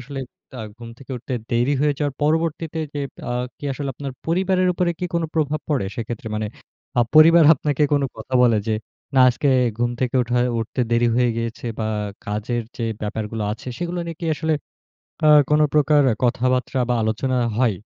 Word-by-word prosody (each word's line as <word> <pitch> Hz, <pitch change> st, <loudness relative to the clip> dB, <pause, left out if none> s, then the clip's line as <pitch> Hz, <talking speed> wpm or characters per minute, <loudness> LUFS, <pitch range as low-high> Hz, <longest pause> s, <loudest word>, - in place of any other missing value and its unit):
আসলে 135 Hz, +2 st, -6 dB, 0.3 s
তা 130 Hz, -, -8 dB, 0.2 s
ঘুম 120 Hz, -1 st, -10 dB
থেকে 135 Hz, -, -14 dB
উঠতে 125 Hz, +2 st, -5 dB, 0.2 s
দেরি 120 Hz, +5 st, +2 dB
হয়ে 145 Hz, 0 st, +2 dB
যাওয়ার 145 Hz, -2 st, -1 dB
পরবর্তীতে 160 Hz, +1 st, 0 dB, 0.2 s
যে 145 Hz, -, -2 dB, 0.3 s
আ -, -, 0 dB, 0.3 s
কি -, -, -10 dB
আসলে 140 Hz, +1 st, -4 dB
আপনার 135 Hz, 0 st, -6 dB
পরিবারের 185 Hz, +2 st, +2 dB
উপরে 175 Hz, 0 st, 0 dB
কি 180 Hz, -, -2 dB
কোন 170 Hz, -, +1 dB
প্রভাব 155 Hz, -1 st, 0 dB
পড়ে 140 Hz, -10 st, 0 dB
সেক্ষেত্রে? 115 Hz, -1 st, -5 dB
মানে 105 Hz, 0 st, -2 dB, 0.5 s
আ -, -, +6 dB
পরিবার 165 Hz, +2 st, +8 dB
আপনাকে 145 Hz, 0 st, -1 dB
কোন 145 Hz, -, +3 dB
কথা 110 Hz, +4 st, -7 dB
বলে 115 Hz, -3 st, +4 dB
যে 110 Hz, -, +2 dB, 0.4 s
না 130 Hz, -, +5 dB
আজকে 140 Hz, +3 st, 0 dB, 0.3 s
ঘুম 120 Hz, 0 st, +1 dB
থেকে 130 Hz, -1 st, -1 dB
ওঠায় 125 Hz, +1 st, +1 dB
উঠতে 115 Hz, +3 st, -3 dB
দেরি 120 Hz, 0 st, +3 dB
হয়ে 125 Hz, -1 st, +3 dB
গিয়েছে 115 Hz, +1 st, -4 dB
বা 110 Hz, -, -1 dB, 0.4 s
কাজের 105 Hz, +3 st, -2 dB
যে 115 Hz, -, -2 dB, 0.2 s
ব্যাপারগুলো 105 Hz, +1 st, -3 dB
আছে 115 Hz, +4 st, -8 dB
সেগুলো 175 Hz, 0 st, -3 dB
নিয়ে 165 Hz, -, -6 dB
কি 170 Hz, -, -3 dB
আসলে 160 Hz, +1 st, 0 dB, 0.7 s
আ -, -, +7 dB, 0.2 s
কোন 150 Hz, 0 st, +4 dB
প্রকার 150 Hz, 0 st, +4 dB, 0.2 s
কথাবার্তা 125 Hz, +2 st, +1 dB
বা 125 Hz, -, +2 dB
আলোচনা 120 Hz, +4 st, 0 dB, 0.2 s
হয়? 120 Hz, -6 st, +2 dB
130 Hz, 180 wpm, -22 LUFS, 120-150 Hz, 0.7 s, পরিবার